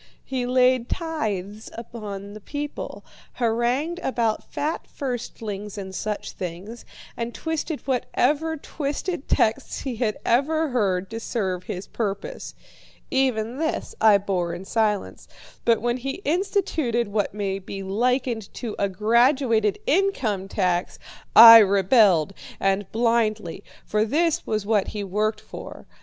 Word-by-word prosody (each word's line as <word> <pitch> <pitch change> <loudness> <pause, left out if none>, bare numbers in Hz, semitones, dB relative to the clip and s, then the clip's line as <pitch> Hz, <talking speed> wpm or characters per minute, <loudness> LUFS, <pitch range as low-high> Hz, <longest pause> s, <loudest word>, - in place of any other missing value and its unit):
He 255 -2 -2
laid 255 -1 +3
tithes 215 - -3
upon 205 -4 -7
the 215 - -10
people, 290 +5 -6 0.3
harangued 245 +8 0
about 235 -8 -1
fat 305 +3 -3
firstlings 220 -6 -5
and 190 -1 -6
such 210 +2 -4
things, 185 +6 -7 0.3
and 235 0 -4
twisted 320 -1 -3
whatever 290 +4 0
twisted 295 +2 -4
texts 220 - +1
he 255 -4 -4
had 215 -3 0
ever 310 +6 +2
heard 195 -7 0
to 225 - -4
serve 190 -6 -2
his 185 +1 -5
purpose. 230 - -4 0.6
Even 255 -2 0
this 320 0 -2
I 215 -2 +7
bore 180 -4 -2
in 180 +2 -8
silence, 210 -1 -1 0.4
but 230 -2 +3
when 240 +1 +1
he 270 +9 -5
instituted 310 - 0
what 205 -1 -1
may 195 -2 -2
be 195 +1 -7
likened 235 +2 0
to 230 -4 -5
a 200 - +1
graduated 230 +1 +3
income 270 - +1
tax, 180 -3 0 0.4
I 230 0 +12
rebelled, 195 - +4 0.3
and 195 0 0
blindly, 220 -5 0 0.2
for 215 0 +1
this 310 +8 +1
was 215 -2 -1
what 210 -2 +2
he 210 -1 -4
worked 210 +3 -1
for. - - -10
225 Hz, 130 wpm, -24 LUFS, 200-260 Hz, 0.6 s, I